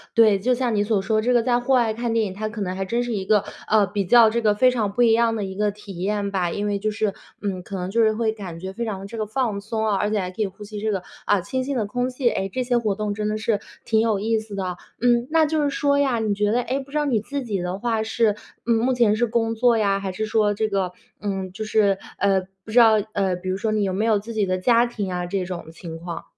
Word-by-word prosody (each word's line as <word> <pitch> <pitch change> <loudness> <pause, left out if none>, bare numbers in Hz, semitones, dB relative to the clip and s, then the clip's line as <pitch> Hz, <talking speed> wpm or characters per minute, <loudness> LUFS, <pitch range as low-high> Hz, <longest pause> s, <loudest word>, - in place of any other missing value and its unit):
对， 215 -3 +6
就 250 +5 +2
像 245 -2 0
你 205 - +2
所 205 -2 +1
说 215 +2 +1
这 245 +3 +1
个 240 -1 +4
在 245 0 +2
户 245 +2 -3
外 235 -3 +3
看 235 0 -2
电 225 -1 +2
影， 190 - -5
它 215 +2 -3
可 215 0 -8
能 185 -2 -2
还 195 - -2
真 235 +5 -1
是 240 -1 -3
一 195 -2 -2
个， 210 0 +3 0.3
呃， 210 -2 +5
比 200 +1 -1
较 230 +2 +7
这 235 +1 -1
个 210 -2 +3
非 255 +4 +5
常 215 -5 -1
不 245 - -1
一 225 -1 +5
样 230 0 +3
的 205 -2 -2
一 190 0 -6
个 210 0 +1
体 200 -3 -10
验 200 +1 -1
吧， 180 -3 0
因 205 - -2
为 205 -1 -1
就 215 +1 -1
是 210 -2 -1 0.3
嗯， 190 -3 -3
可 200 - -7
能 180 +1 -3
就 230 +3 +2
是 220 - +4
会 220 0 0
感 185 -6 -8
觉 190 +1 -6
非 235 - -4
常 200 -3 -4
的 195 - -8
这 225 +3 -8
个 215 - -1
放 215 -2 -1
松 220 +1 -2
啊， 205 - +2
而 210 +2 0
且 215 - 0
还 185 -1 -3
可 215 - -5
以 210 - +2
呼 195 +2 -11
吸 205 0 -7
这 220 0 0
个， 190 -2 -1 0.2
啊， 205 -2 +3
清 260 +6 -2
新 275 -1 -2
的 215 - 0
空 245 +5 -1
气。 255 -1 -1
诶， 195 0 -2
这 255 - -1
些 245 -1 +1
活 215 -4 0
动 210 0 -2
真 210 0 -2
的 215 - -1
是 215 -1 0 0.3
挺 220 -1 +3
有 220 -3 +1
意 220 +2 +1
思 215 -2 -8
的。 185 -2 -3 0.2
嗯， 240 0 +2
那 320 0 +4
就 310 0 0
是 285 - +2
说 280 0 +1
呀， 265 -5 +2
你 215 -2 0
觉 205 +1 +1
得 245 +2 +2
诶？ 260 +4 -1
不 275 0 -10
知 300 - -2
道 295 - +1
你 245 -6 +2
自 275 +4 -4
己 205 -5 -2
的 180 +2 -3
话 225 -1 0
是， 220 -1 +1 0.3
嗯， 235 - +3
目 245 +3 +2
前 230 -4 +3
是 240 - +2
工 225 0 0
作 240 0 +3
呀？ 200 -2 +2
还 195 -1 -3
是 215 +4 -3
说 215 -1 +2
这 215 +1 0
个， 195 -3 -1 0.3
嗯， 195 -2 -3
就 215 +3 -6
是， 210 -2 +2 0.2
呃， 195 -1 +2 0.2
不 220 - -8
知 240 - +5
道 225 -2 +7 0.2
呃， 190 -2 +1
比 185 +1 -6
如 190 - 0
说 215 +2 -1
你 210 -1 +1
有 190 -1 -1
没 205 - 0
有 220 -2 +3
自 225 +3 -6
己 210 -2 +1
的 185 0 0
家 235 +5 +4
庭 205 -5 -4
啊， 180 0 -2
这 185 0 -2
种 175 -2 -6
情 165 -1 -8
况？ 170 0 -6
215 Hz, 325 characters per minute, -23 LUFS, 195-235 Hz, 0.3 s, 较